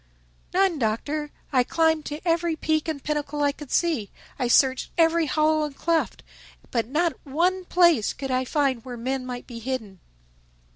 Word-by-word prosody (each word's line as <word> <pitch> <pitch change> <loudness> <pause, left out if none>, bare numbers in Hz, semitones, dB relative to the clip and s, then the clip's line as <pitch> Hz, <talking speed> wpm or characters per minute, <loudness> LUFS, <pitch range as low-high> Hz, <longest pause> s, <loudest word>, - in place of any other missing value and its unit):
"None, 370 -4 +2
Doctor. 285 +7 -1 0.2
I 255 -2 +5
climbed 320 +2 +1
to 300 +4 -6
every 335 0 +2
peak 315 0 0
and 310 -4 -3
pinnacle 295 -1 -2
I 285 - +3
could 295 -1 -11
see. 310 - +1 0.3
I 250 - +1
searched 260 +2 +3
every 330 -1 +3
hollow 310 +1 +2
and 295 -2 -4
cleft. 330 +1 -1 0.5
But 230 -3 0
not 325 +6 +1
one 355 +6 0
place 345 - +4
could 270 0 -5
I 255 0 +1
find 265 -3 0
where 250 -2 -7
men 255 +2 -3
might 245 -1 -6
be 235 -2 -8
hidden." 225 -6 -4
295 Hz, 165 wpm, -25 LUFS, 255-325 Hz, 0.5 s, I